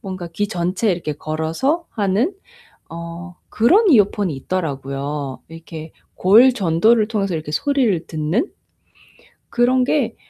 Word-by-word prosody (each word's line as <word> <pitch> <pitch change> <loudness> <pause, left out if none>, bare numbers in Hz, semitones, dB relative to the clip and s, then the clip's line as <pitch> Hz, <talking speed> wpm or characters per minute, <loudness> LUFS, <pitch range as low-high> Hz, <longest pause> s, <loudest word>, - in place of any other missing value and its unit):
뭔가 185 -3 -6
귀 205 +3 -1
전체에 185 +2 0
이렇게 165 -3 -3
걸어서 160 - -2
하는 215 - 0 0.5
어 170 +2 -8
그런 375 - +4
이어폰이 205 - +3
있더라고요. 140 -3 -4
이렇게 165 -1 -10 0.2
골 230 +8 +6
전도를 215 +3 +2
통해서 200 -5 -1
이렇게 155 -1 -5
소리를 235 - +1
듣는. 160 - -1 1.0
그런 250 +1 +2
게 250 -6 0
185 Hz, 275 characters per minute, -20 LUFS, 160-230 Hz, 1.0 s, 골